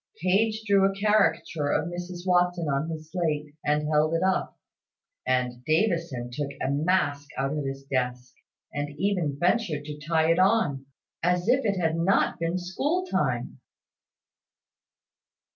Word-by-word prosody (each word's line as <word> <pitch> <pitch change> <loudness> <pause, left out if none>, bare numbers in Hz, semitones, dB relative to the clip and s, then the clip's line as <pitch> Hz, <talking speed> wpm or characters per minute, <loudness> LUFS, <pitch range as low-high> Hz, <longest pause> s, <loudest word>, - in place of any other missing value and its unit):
Page 215 +6 +1
drew 200 -2 +4
a 195 0 +1
caricature 180 -7 +2
of 155 +2 +1
Mrs 175 +1 -6
Watson 180 -2 +2
on 140 +3 0
his 160 -1 -7
slate, 155 -4 -2
and 150 0 +1
held 155 +1 +2
it 165 - 0
up; 190 0 0 0.7
and 125 -1 0
Davison 160 - 0
took 140 +3 -3
a - - -1
mask 145 -2 +1
out 135 +2 -1
of 150 - -2
his 135 0 -5
desk, 125 -2 -2 0.4
and 145 0 -4
even 180 -8 0
ventured 175 -4 +1
to 150 0 -7
tie 160 +2 +2
it 165 - +2
on, 185 -10 +2 0.3
as 180 +2 +1
if 260 +3 +3
it 200 -3 +1
had 165 -1 +1
not 180 +1 +2
been 170 +2 -1
school 285 - -1
time. - - -1
165 Hz, 145 wpm, -26 LUFS, 145-185 Hz, 0.7 s, drew